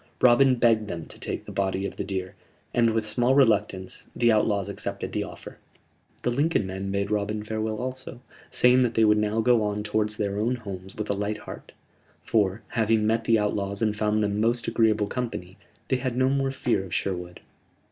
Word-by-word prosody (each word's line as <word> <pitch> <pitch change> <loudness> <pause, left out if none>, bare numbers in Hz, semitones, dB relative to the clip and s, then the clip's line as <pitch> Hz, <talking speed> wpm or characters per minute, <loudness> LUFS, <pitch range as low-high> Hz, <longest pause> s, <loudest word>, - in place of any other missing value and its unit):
Robin 125 +2 +5
begged 115 -3 +3
them 85 -4 -5
to - - -14
take - - -4
the - - -8
body 95 0 -1
of - - -5
the - - -3
deer, 95 -2 -4 0.4
and, 115 -1 +4
with 110 -1 0
small 120 +4 +2
reluctance, 105 -7 +1
the 120 -1 +4
outlaws 105 -2 +2
accepted 100 - -5
the - - -1
offer. - - -10 0.6
The 120 - +1
Lincoln 145 - +1
men 95 +1 -4
bade 100 +1 -1
Robin 105 0 -1
farewell 110 0 -3
also, 130 0 -6 0.3
saying 125 +1 +4
that 120 -2 +1
they 115 - +5
would 105 0 +4
now 105 +1 +1
go 120 0 +4
on 105 0 -1
towards 105 0 -1
their 100 -1 -1
own 120 +4 +1
homes 95 -5 -8
with 105 -1 -3
a - - 0
light 105 +1 -2
heart: - - -10 0.5
for, 105 0 +1
having 110 -1 +2
met 115 +1 +1
the 115 - +4
outlaws 100 0 -1
and 105 -1 +1
found 105 0 +1
them 105 0 0
most 115 +1 +1
agreeable 110 -2 +2
company, 100 -6 -5 0.3
they 130 - +2
had 125 -1 -3
no 130 0 +3
more 135 0 +1
fear 125 -6 0
of 90 -3 -5
Sherwood. 90 -2 -3
110 Hz, 200 wpm, -26 LUFS, 100-120 Hz, 0.6 s, Robin